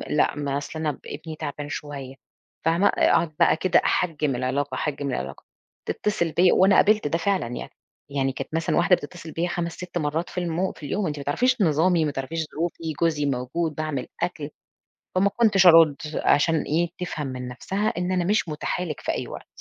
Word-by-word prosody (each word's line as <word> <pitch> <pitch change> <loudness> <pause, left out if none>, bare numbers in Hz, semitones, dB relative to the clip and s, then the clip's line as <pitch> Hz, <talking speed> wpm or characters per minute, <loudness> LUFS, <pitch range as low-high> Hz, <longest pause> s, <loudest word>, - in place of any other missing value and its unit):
لأ 150 - +2
ما 140 -1 -2
أصل 155 +2 -6
أنا 150 -3 -2
ابني 160 -1 -7
تعبان 145 0 -5
شوية، 145 -3 -6 0.5
فاهمة؟ 170 +5 +4
أقعد 160 -2 +2
بقى - - +5
كده 185 +2 +3
أحجِّم 150 -6 +1
العلاقة 130 +2 -1
أحجِّم 145 -1 -2
العلاقة، 65 - -5 0.4
تتصل 195 -6 -1
بيّا 180 +2 +4
وأنا 190 +1 +5
قابلت 210 -4 +4
ده 165 - 0
فعلًا 190 -4 0
يعني 120 - -6 0.4
يعني 135 -1 0
كانت 135 - -7
مثلًا 165 0 0
واحدة 180 +2 +5
بتتصل 165 0 -9
بيّا 170 +2 -1
5 170 -1 -2
6 180 0 -6
مرات 160 +2 -1
في - - -13
المو 175 +2 -1
في - - -15
اليوم 195 +6 -1
أنتِ 150 -1 -3
ما 140 - -5
تعرفيش 250 - +1
نظامي 165 0 +3
ما 150 - -1
تعرفيش 155 +4 -3
ظروفي 165 0 -3
جوزي 155 -3 +2
موجود 140 +5 -2
باعمل 155 -5 -3
أكْل، 170 -4 -2 0.7
فما 190 +2 +4
كنتش 205 -5 +4
أرُد 165 -4 +8 0.2
عشان 160 +2 +3
إيه 170 +3 0
تفهم 170 -5 -4
من 125 -1 -5
نَفْسها 195 - -2
إن 180 +1 -1
أنا 180 -1 +1
مش 205 0 +1
مُتاحة 155 +3 -2
لِك 155 -5 -5
في - - -1
أي - - -4
وقت. - - -8
160 Hz, 190 wpm, -24 LUFS, 145-180 Hz, 0.7 s, أرُد